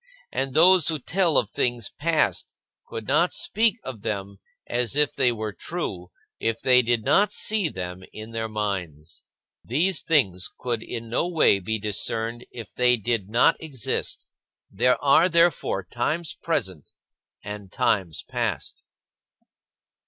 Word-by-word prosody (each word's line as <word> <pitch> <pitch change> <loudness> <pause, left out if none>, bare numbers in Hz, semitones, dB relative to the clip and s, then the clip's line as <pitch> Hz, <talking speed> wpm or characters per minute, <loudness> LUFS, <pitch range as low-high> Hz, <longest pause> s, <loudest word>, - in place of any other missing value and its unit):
And 135 -1 -3
those 175 0 +6
who 160 - +2
tell 170 +4 +1
of 105 - +1
things 120 -3 -1
past 160 +1 0 0.3
could 110 -1 -7
not 160 +6 +2
speak 225 +2 +1
of 125 -6 -7
them 100 -2 -4 0.3
as 120 +2 -1
if 150 -1 +2
they 125 -2 +2
were 110 -2 -4
true, 95 - -5 0.3
if 115 0 -1
they 125 0 +5
did 120 -2 0
not 205 0 +4
see 210 -5 +1
them 90 -4 -6
in 110 +1 -9
their 110 -1 -3
minds. 90 -7 -4 0.4
These 160 +9 +1
things 95 - +1
could 120 -3 -2
in 115 0 -6
no 120 +9 0
way 160 - +4
be 110 +4 -2
discerned 110 +3 -2
if 115 -5 -10
they 125 0 +3
did 110 -3 -2
not 115 +3 +4
exist. 140 -9 -3 0.5
There 125 0 +2
are 150 +6 +5
therefore 170 - +2
times 150 - -2
present 95 - -3 0.5
and 105 -2 -8
times 95 -9 0
past. - - -3
120 Hz, 140 wpm, -25 LUFS, 105-155 Hz, 0.5 s, those